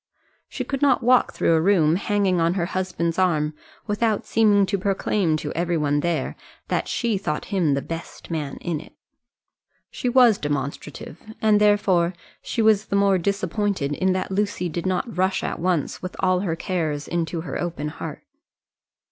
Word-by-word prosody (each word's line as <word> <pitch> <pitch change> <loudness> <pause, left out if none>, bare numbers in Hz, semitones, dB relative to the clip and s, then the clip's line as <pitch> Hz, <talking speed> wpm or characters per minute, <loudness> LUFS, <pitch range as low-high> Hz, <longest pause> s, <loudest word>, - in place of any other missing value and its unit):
She - - -4
could 275 -1 -4
not 280 -3 +3
walk 250 +1 +4
through - - +1
a 160 - +3
room 165 -4 +4
hanging 195 -2 +1
on 165 +2 +2
her 175 -3 0
husband's 175 -2 -2
arm 155 -5 +2 0.3
without 215 0 0
seeming 210 -3 +4
to 200 +1 -1
proclaim 190 -3 +1
to - - -5
every 175 0 0
one 145 -1 +1
there 160 -3 -1 0.3
that - - 0
she 230 -5 0
thought 150 -5 -3
him 165 -7 +2
the 140 - -2
best 165 +1 -8
man 150 -4 -3
in 165 -4 -2
it. - - -16 1.0
She 250 - -2
was 245 -4 +5
demonstrative, 145 +2 -4 0.2
and 215 -1 +3
therefore 190 -4 +3 0.3
she 230 - -1
was 215 -1 +4
the - - -1
more 200 -1 +3
disappointed 195 -4 -1
in 185 +5 +1
that 185 +1 -3
Lucy 190 -3 -1
did 170 +3 -3
not 185 +5 -2
rush 190 +1 +1
at - - -3
once 175 -3 -1
with 185 - -6
all 185 -1 +2
her 180 -4 -1
cares 160 -5 -2
into 170 -1 -2
her 170 - -4
open 165 -4 -3
heart. - - -7
185 Hz, 175 wpm, -23 LUFS, 165-205 Hz, 1.0 s, was